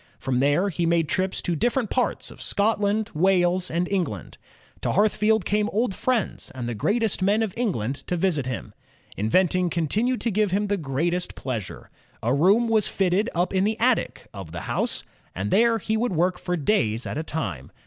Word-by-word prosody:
From 125 -2 -1
there 145 +9 +2
he 170 -2 -1
made 165 -2 +2
trips 185 +3 -1
to 175 - 0
different 240 - 0
parts 250 - -1
of - - -12
Scotland, 210 0 0
Wales, 180 +1 +2
and 170 +2 0
England. 170 - -3 0.4
To - - -1
Hearthfield 215 +1 +2
came 210 +1 +1
old 220 0 0
friends 245 +1 -1
and 125 -2 -4
the 120 - -2
great 205 - 0
est 215 -3 0
men 210 +4 +3
of 205 -4 -3
England 140 - -1
to 180 - 0
visit 165 -7 0
him. 125 - -5 0.4
Inventing 180 - +2
continued 210 - 0
to 235 - 0
give 210 +1 +2
him 200 +3 0
the 205 - +1
greatest 170 +4 -1
pleasure. 115 -8 -5 0.3
A 120 +3 +2
room 195 - +4
was 220 -2 +3
fitted 195 +4 +1
up 175 +3 0
in 190 0 +2
the 220 +2 0
attic 245 +1 +1
of 95 -5 -8
the 85 0 -5
house, - - -1 0.3
and 100 +3 -3
there 230 +1 +4
he 220 +1 -2
would 235 -2 0
work 180 +2 +1
for 180 0 -2
days 125 - +1
at - - -3
a - - -2
time. 95 - -4
185 Hz, 190 wpm, -24 LUFS, 150-215 Hz, 0.4 s, room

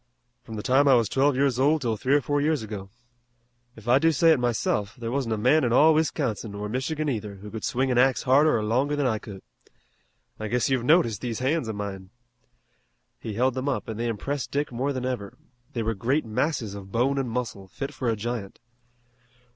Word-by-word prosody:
"From 110 -2 -9
the 105 - -5
time 135 +2 +3
I 135 - +7
was 115 -3 +3
twelve 140 +1 +2
years 135 -2 +1
old 145 +2 +3
'til 115 -2 0
three 130 +6 +1
or 145 - +3
four 145 +1 0
years 150 -4 +1
ago. 100 -3 -7 0.9
If 110 0 -14
I 125 +3 +5
do 165 +2 +4
say 165 +2 +4
it 155 - +4
myself, 110 -3 -1
there 115 -1 -5
wasn't 125 -4 -1
a - - -5
man 130 +8 +3
in 120 - +1
all 155 +6 +6
Wisconsin, 125 -9 -1
or 105 +1 -4
Michigan 145 +7 -2
either, 105 -6 -3
who 100 +2 -10
could 110 - -6
swing 130 +1 0
an 125 - +3
axe 130 0 +3
harder 140 +1 +4
or 110 - -2
longer 130 +7 +1
than 145 -1 0
I 110 -4 +1
could. 100 -3 -10 1.0
I 110 - -3
guess 125 +4 0
you've 130 -3 +1
noticed 125 - +3
these 120 -3 -3
hands 135 +1 0
of 110 - -4
mine." 95 -2 -6 1.1
He 110 - -6
held 130 +3 +2
them 130 +2 -2
up, 135 - -2
and 110 -1 -5
they 120 - -1
impressed 130 +5 -3
Dick 145 0 -2
more 130 +4 -1
than 130 -2 -3
ever. 120 -6 -4 0.4
They 115 - -2
were 115 +1 0
great 125 +9 0
masses 115 -1 -1
of 100 -1 -9
bone 130 +5 +1
and 130 -3 -2
muscle 115 -5 -4
fit 135 +8 -6
for 130 -3 -2
a 115 - +1
giant. 110 -2 -5
125 Hz, 220 wpm, -26 LUFS, 110-140 Hz, 1.1 s, I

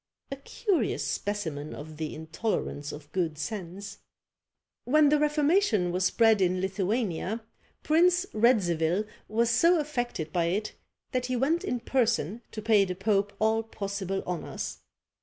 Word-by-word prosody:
A - - -2
curious 360 - -1
specimen 160 -8 -3
of 155 +1 -9
the 155 -1 -4
intolerance 160 -2 -3
of 150 0 -10
good 165 -4 -1
sense. 195 +2 -6 0.9
When 300 +3 +5
the 300 0 +4
Reformation 300 - +2
was 180 +1 0
spread 225 0 +4
in 185 0 +2
Lithuania, 195 +2 -1 0.4
Prince 355 +4 +4
Radzivil 190 -6 +2 0.2
was 230 +2 +1
so 335 +8 +5
affected 245 - -3
by 175 -2 +2
it, 200 +6 -1 0.4
that 250 -1 -1
he 255 - -1
went 295 +8 +1
in 245 -1 -2
person 230 - 0
to 215 - -6
pay 215 -2 +5
the 185 -2 -3
pope 200 +1 +1
all 220 +1 +2
possible 200 -3 -4
honours. 180 -2 -4
210 Hz, 140 wpm, -28 LUFS, 180-245 Hz, 0.9 s, When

